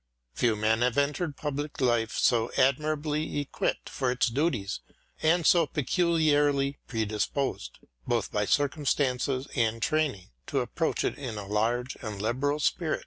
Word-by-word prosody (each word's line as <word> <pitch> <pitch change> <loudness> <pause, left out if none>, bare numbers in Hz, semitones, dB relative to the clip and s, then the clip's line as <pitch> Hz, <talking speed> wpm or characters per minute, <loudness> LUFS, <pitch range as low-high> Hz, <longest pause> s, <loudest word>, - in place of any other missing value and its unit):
Few 115 - +2
men 110 +2 +1
have 125 0 +1
entered 145 +2 0
public 145 0 -4
life 120 -3 +1
so 115 -2 +3
admirably 150 +2 +1
equipped 145 - -2
for 130 -2 -1
its 125 0 +2
duties 125 -6 -1 0.4
and 165 +1 +3
so 170 -1 +5
peculiarly 145 -3 +2
predisposedj 110 - -2 0.4
both 115 -4 0
by 105 0 0
circumstances 135 -1 0
and 115 -3 +1
training, 140 - -1 0.2
to - - 0
approach - - -1
it - - -2
in 125 -6 -5
a 105 - -5
large 115 +5 -1
and 105 -5 -5
liberal 130 +7 0
spirit. 155 +1 0
135 Hz, 140 wpm, -28 LUFS, 115-150 Hz, 0.4 s, so